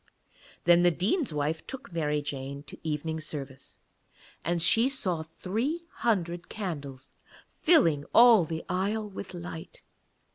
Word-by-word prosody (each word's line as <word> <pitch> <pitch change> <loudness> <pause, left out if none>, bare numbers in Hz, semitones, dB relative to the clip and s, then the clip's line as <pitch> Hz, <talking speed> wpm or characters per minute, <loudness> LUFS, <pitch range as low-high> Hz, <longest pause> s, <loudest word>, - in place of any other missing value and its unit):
Then 175 0 +6
the 175 - +6
Dean's 200 - 0
wife 150 +2 -2
took 260 -8 -8
Mary 150 -3 0
Jane 140 -1 -5
to - - -12
evening 160 +1 -3
service, 140 -4 -8 0.7
and 175 0 0
she 225 +9 +4
saw 185 -11 -2
three 220 - -3
hundred 175 -6 -1
candles 145 -10 -6 0.5
filling 165 - +4
all 230 -5 +8
the 160 0 -5
aisle 205 +4 -1
with 190 -2 -8
light. 170 -2 -8
170 Hz, 130 wpm, -28 LUFS, 150-210 Hz, 0.7 s, all